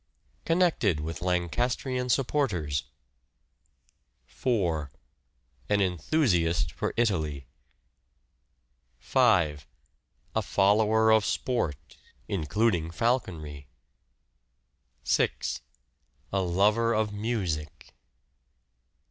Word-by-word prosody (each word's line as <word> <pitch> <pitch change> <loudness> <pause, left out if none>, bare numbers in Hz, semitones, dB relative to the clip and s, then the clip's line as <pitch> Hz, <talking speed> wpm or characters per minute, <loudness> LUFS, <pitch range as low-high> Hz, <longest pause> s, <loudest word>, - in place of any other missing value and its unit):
Connected 165 - +2
with 80 +1 -5
Lancastrian 120 - -1
supporters. 105 - 0 1.4
4. 85 - -1 0.8
An 105 0 +3
enthusiast 90 - +1
for - - -3
Italy. 80 - 0 1.5
5. 75 -3 +2 0.7
A - - +2
follower 110 +2 +3
of 110 -1 +5
sport 100 - -2 0.3
(including 90 0 0
falconry). 85 - -2 1.4
6. - - 0 0.7
A 95 - +2
lover 105 +6 +2
of 110 -1 0
music. 100 -8 -3
100 Hz, 65 wpm, -28 LUFS, 80-115 Hz, 1.5 s, of